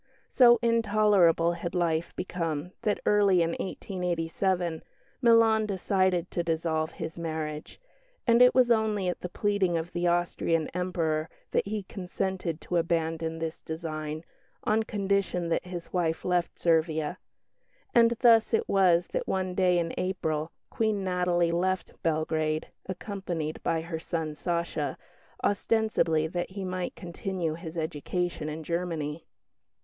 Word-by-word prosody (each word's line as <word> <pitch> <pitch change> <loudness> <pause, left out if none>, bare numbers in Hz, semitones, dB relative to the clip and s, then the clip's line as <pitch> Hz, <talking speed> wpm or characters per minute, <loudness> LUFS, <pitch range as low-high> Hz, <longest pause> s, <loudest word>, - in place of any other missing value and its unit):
So 240 -2 +7
intolerable 210 -7 +4
had 170 +1 -5
life 170 -1 0
become 165 -2 -3
that, 210 - 0
early 200 -4 +4
in 165 - 0
1887, 180 -2 -2 0.4
Milan 225 -2 +5
decided 185 -2 +1
to 175 - 0
dissolve 160 -1 -1
his 160 +1 -6
marriage; 155 -2 -4 0.5
and 235 0 +5
it 250 0 +7
was 250 -2 +5
only 215 -4 +2
at 180 - -4
the 180 - -4
pleading 195 -3 +1
of 165 +2 -5
the 175 0 0
Austrian 170 -2 +1
Emperor 165 -3 -1 0.2
that - - +1
he 210 0 -3
consented 180 -3 -3
to 175 - -1
abandon 165 -1 0
this 160 0 -4
design, 155 -1 -5 0.4
on 220 +1 +2
condition 200 -5 -1
that 165 - 0
his 175 -2 -7
wife 165 -3 0
left 180 -2 0
Servia; 160 -2 +1 0.7
and 235 0 +5
thus 230 -2 +6
it - - -1
was 180 -3 +4
that - - -3
one 185 -1 -1
day 180 -1 +3
in 165 -1 -1
April 160 -4 -1 0.2
Queen 215 -3 0
Natalie 180 -2 +1
left 185 +2 -1
Belgrade, 155 -1 0 0.2
accompanied 180 -5 -4
by 165 - 0
her 165 -1 -5
son 160 -2 -3
"Sacha," 165 -3 -2 0.5
ostensibly 205 -7 +2
that 175 +2 -3
he 190 0 -5
might 185 -1 -3
continue 175 -1 -3
his 165 0 -8
education 160 +1 -2
in 155 +1 -5
Germany. 165 -2 -3
175 Hz, 135 wpm, -28 LUFS, 160-190 Hz, 0.7 s, So